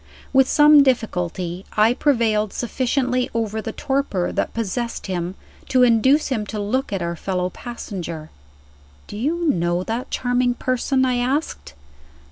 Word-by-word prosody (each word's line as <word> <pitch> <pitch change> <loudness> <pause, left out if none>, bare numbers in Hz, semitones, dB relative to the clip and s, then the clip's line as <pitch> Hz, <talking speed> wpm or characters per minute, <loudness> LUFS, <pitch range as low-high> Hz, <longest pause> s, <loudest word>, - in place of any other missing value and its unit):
With 265 -1 +5
some 295 0 +7
difficulty, 185 -8 -1
I 215 +3 +5
prevailed 225 -7 +1
sufficiently 255 +1 -1
over 220 -1 -1
the 225 - -5
torpor 265 -9 -1
that - - -1
possessed 230 +2 -3
him 180 -1 -3 0.3
to 255 -1 +4
induce 255 +6 +4
him 235 -6 -1
to 215 - -4
look 240 +6 -1
at 195 -3 -2
our 170 0 -2
fellow 180 +1 -2
passenger. 175 -10 -7 0.7
"Do - - -10
you 320 +10 -1
know 175 - +1
that 230 +5 -4
charming 245 0 0
person?" 260 +1 0
I 250 -1 +1
asked. 250 - -2
230 Hz, 140 wpm, -21 LUFS, 190-260 Hz, 0.7 s, some